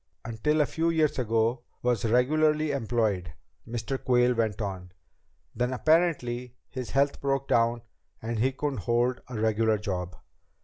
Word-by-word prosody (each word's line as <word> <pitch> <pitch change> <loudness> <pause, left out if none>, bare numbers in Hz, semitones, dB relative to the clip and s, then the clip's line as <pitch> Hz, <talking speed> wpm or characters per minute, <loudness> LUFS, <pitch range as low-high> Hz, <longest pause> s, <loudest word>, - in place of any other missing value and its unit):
"... - - -47
until 120 +7 +1
a - - +4
few 165 +3 0
years 155 -4 +1
ago 115 +1 +1 0.2
was 120 -3 +1
regularly 150 +6 +2
employed," 110 - -1 0.3
Mr. 120 +3 -4
Quayle 125 0 +3
went 110 -3 -1
on. 95 -4 -5 0.6
"Then, 125 +1 -1
apparently, 125 -5 +1
his 130 -2 -6
health 140 +1 +1
broke 135 -1 0
down 115 0 +2 0.4
and 115 0 -3
he 130 +4 +2
couldn't 135 -1 -3
hold 120 +5 0
a 125 -4 -5
regular 110 0 +2
job. 90 -3 -4
120 Hz, 145 wpm, -27 LUFS, 110-135 Hz, 0.6 s, a